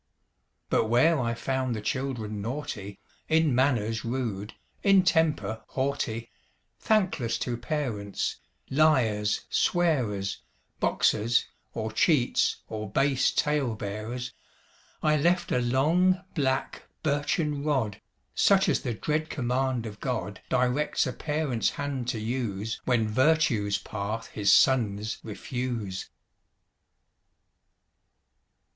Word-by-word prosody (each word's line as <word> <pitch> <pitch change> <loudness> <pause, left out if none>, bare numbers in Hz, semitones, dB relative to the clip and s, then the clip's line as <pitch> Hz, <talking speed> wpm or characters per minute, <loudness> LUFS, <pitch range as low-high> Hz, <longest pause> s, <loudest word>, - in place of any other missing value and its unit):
But - - +3
where 130 +8 +4
I 115 -2 -1
found 130 0 -1
the - - -3
children 115 -5 -3
naughty, 110 -5 -5 0.3
In 160 -3 +3
manners 120 -4 +1
rude, 115 -4 -3 0.3
in 195 -2 +5
temper 160 -10 +1
haughty, 130 -4 -2 0.5
Thankless 185 - +1
to 120 - -1
parents, 120 -6 -3 0.3
liars, 120 -9 +3
swearers, 125 - +1 0.4
Boxers, 115 +3 +2 0.3
or 110 -1 -3
cheats, 125 +3 +2
or 110 -2 -5
base 135 +4 +2
tale 145 -6 0
bearers, 110 +5 -5 0.7
I 155 0 +4
left 175 +4 +1
a - - +3
long, 165 +10 +2
black, 135 -4 -1 0.2
birchen 145 0 0
rod, 130 -10 0 0.3
Such 195 -1 +4
as - - +2
the 120 -5 -3
dread 155 +7 -1
command 125 -2 -1
of 105 -2 -8
God 105 -7 -3
Directs 125 +6 +1
a 125 - -3
Parent's 150 -6 -1
hand 140 -4 -4
to 115 - -1
use 110 -2 -3
When 120 -4 +2
virtue's 120 -5 +2
path 105 +2 -5
his 100 -2 +2
sons 110 -3 +3
refuse. 115 -3 -4
125 Hz, 105 wpm, -27 LUFS, 110-145 Hz, 0.7 s, in